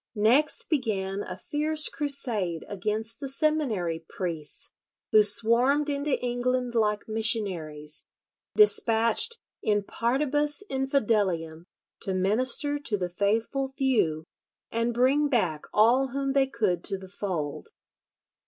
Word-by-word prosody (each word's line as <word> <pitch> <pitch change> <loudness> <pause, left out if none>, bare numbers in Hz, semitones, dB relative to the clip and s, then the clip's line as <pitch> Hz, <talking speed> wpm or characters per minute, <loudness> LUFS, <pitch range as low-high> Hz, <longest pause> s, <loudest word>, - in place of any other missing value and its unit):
Next 240 +9 +3
began 205 - -1
a 185 -2 -7
fierce 305 +1 +1
crusade 230 - 0
against 215 +3 -3
the 275 - -5
"seminary" 260 - -1
priests, 165 -5 -5 0.4
who 215 - +7
swarmed 235 +8 +3
into 285 0 -1
England 245 0 -1
like 210 -2 0
missionaries, 185 -10 0 0.5
despatched 235 - +4 0.2
in 205 -1 +1
partibus 290 - -1
infidelium 205 - 0 0.3
to 190 - -3
minister 255 +9 +1
to 235 -7 -1
the 180 -2 -4
faithful 225 +8 0
few 250 - 0 0.5
and 230 +1 0
bring 265 +5 +2
back 180 - 0
all 240 +5 +4
whom 275 +1 -2
they 275 -1 +3
could 205 -9 -1
to 195 - 0
the 190 0 -11
fold. 180 -7 -4
230 Hz, 115 wpm, -27 LUFS, 195-270 Hz, 0.5 s, who